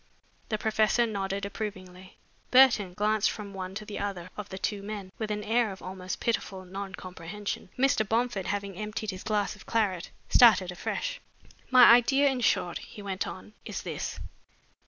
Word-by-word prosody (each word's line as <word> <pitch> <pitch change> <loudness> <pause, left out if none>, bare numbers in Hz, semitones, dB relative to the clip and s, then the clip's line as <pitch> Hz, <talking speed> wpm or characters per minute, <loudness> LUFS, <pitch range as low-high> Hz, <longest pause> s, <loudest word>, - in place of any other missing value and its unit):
The 215 - 0
professor 220 +2 +2
nodded 200 -2 -2
approvingly. 185 -3 -7 0.3
Burton 240 -8 +5
glanced 210 +1 +2
from 205 -2 -7
one 190 0 -6
to 215 +1 -5
the 210 - -6
other 185 -3 -4
of 210 -1 -7
the 190 - -6
two 200 +1 -2
men 200 -2 -6
with 220 -1 -2
an 210 0 -2
air 225 0 +2
of 190 - -9
almost 185 0 -5
pitiful 195 -5 -2
non 195 +1 -6
comprehension. 185 +3 -6
Mr. 250 -6 +2
Bomford, 230 -4 0
having 200 -1 -3
emptied 210 +1 -4
his 185 0 -8
glass 210 -2 0
of 210 - -16
claret, 200 -6 0 0.2
started 210 -7 +6
afresh. - - -3 0.5
"My 255 -1 +8
idea, 270 +4 +6
in 260 -2 -2
short," 175 -6 +1
he 205 - -11
went 190 -2 -3
on, 210 - -9
"is - - -5
this. - - -4
205 Hz, 170 wpm, -28 LUFS, 190-220 Hz, 0.5 s, My